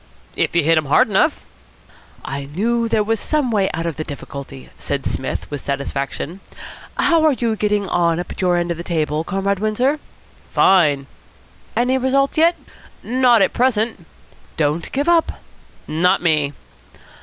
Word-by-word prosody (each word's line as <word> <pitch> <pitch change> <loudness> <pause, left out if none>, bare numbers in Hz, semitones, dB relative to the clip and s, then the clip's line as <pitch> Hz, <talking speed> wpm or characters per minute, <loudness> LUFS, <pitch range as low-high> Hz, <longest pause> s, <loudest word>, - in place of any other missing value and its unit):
"If - - -1
you 170 - +4
hit 165 +1 +4
him 155 - -4
hard 235 - +4
enough." 295 +11 +2 0.8
"I 140 +1 -4
knew 230 +10 -1
there 215 -1 +2
was 225 +1 0
some 295 -2 0
way 200 -3 +2
out 165 +1 -4
of 165 -3 -3
the 155 - -2
difficulty," 140 -2 -9
said 140 -1 -3
Psmith 135 - -3
with 145 -2 -4
satisfaction. 140 +5 -4 0.6
"How 330 -2 +3
are 310 -2 +5
you 235 -3 -1
getting 210 -1 0
on 170 -2 +1
up 175 - -5
at - - -6
your 180 -1 +2
end 175 0 -1
of 170 - -3
the 170 - -6
table, 155 -3 -1
Comrade 195 +2 -1
Windsor?" 245 +8 +1 0.5
"Fine." 150 -8 +4 0.7
"Any 255 +2 +2
result 275 +2 +1
yet?" 335 +2 +4 0.5
"Not 245 -3 +4
at - - +1
present." 225 -7 0 0.5
"Don't 155 +1 -1
give 285 +4 -1
up." 340 -1 +3 0.5
"Not 180 +5 +2
me." 150 -4 +2
190 Hz, 160 wpm, -20 LUFS, 155-240 Hz, 0.8 s, are